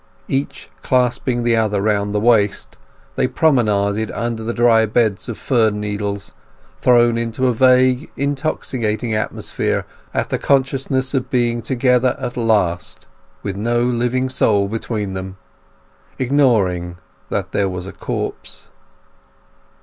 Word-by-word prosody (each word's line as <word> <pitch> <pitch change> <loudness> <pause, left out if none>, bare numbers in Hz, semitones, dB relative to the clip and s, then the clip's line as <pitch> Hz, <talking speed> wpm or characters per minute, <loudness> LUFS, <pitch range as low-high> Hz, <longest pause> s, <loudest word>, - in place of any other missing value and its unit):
Each 135 +1 -3
clasping 125 -1 +1
the 120 -1 +3
other 110 -3 +1
round 100 0 0
the - - +2
waist 105 -3 +2 0.4
they - - +1
promenaded 110 -7 +1
over 115 0 -3
the 110 +1 -3
dry 115 -2 +4
bed 110 -2 +1
of 120 - -5
fir 115 -5 +2
needles, 105 -1 -4 0.5
thrown 120 -1 +4
into 115 +2 -2
a 125 - +3
vague 130 +3 +3
intoxicating 130 -5 -2
atmosphere 110 0 -2 0.3
at - - -2
the - - 0
consciousness 135 -1 0
of 130 -2 -1
being 120 -2 +1
together 125 0 +1
at 120 - -4
last, 105 -7 0 0.4
with 100 - -3
no 120 +4 0
living 125 +1 0
soul 105 -6 +2
between 105 -2 -3
them; 95 0 -6 0.8
ignoring 105 -11 +1 0.3
that - - -2
there 100 -1 +1
was 90 -1 -5
a 100 - -8
corpse. - - -5
115 Hz, 125 wpm, -19 LUFS, 105-125 Hz, 0.8 s, dry